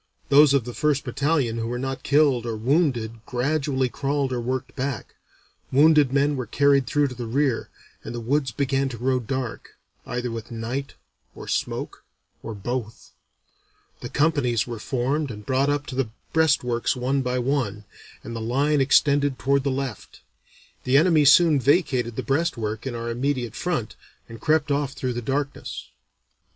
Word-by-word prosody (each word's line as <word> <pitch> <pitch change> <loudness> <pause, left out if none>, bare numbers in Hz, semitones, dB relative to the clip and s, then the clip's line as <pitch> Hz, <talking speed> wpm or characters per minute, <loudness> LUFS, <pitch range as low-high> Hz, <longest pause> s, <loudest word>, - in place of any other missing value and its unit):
Those 140 0 +6
of 135 - +2
the 120 - -6
first 150 0 +1
battalion 135 -3 0
who 115 - -2
were 120 +1 -3
not 135 +1 -4
killed 140 -5 +2
or 115 - -2
wounded 120 -4 0
gradually 135 +1 0
crawled 140 +1 -1
or 120 - -2
worked 130 +2 -3
back; 130 -4 -4 0.6
wounded 150 -1 +5
men 140 +1 +2
were 125 -4 -4
carried 140 +2 +3
through 145 -2 +1
to - - -7
the 120 -1 -6
rear; 130 0 0 0.3
and - - -6
the - - -3
woods 135 +4 0
began 135 +2 0
to 120 - -7
grow 130 +2 +1
dark, 125 0 -5 0.3
either 125 0 -3
with 115 -1 -6
night 120 +4 -4 0.4
or - - -9
smoke - - -3 0.4
or 115 - -6
both. 115 +2 -5 0.9
The - - -7
companies 145 -7 +1
were 120 -2 -6
formed 135 +5 -1
and 105 -2 -8
brought 135 +3 +1
up 145 0 0
to 130 - -7
the 130 -4 -1 0.2
breastworks 135 -8 +2
one 130 +2 0
by 125 -1 -1
one, 120 -5 -1 0.4
and 115 - -7
the 115 - -4
line 140 +6 +1
extended 140 0 +3
toward 140 0 +1
the 140 - 0
left. 135 -1 -5 0.6
The 130 +2 +3
enemy 155 -1 +4
soon 150 +1 +6
vacated 130 -4 +1
the - - -3
breastwork 130 -7 -1
in 125 - -4
our 115 0 -4
immediate 125 -2 -2
front, 155 -12 -2 0.3
and 115 -1 -11
crept 155 -1 +2
off 140 -1 0
through 130 -3 -3
the 120 - -3
darkness." 140 +4 -4
130 Hz, 165 wpm, -24 LUFS, 120-145 Hz, 0.9 s, Those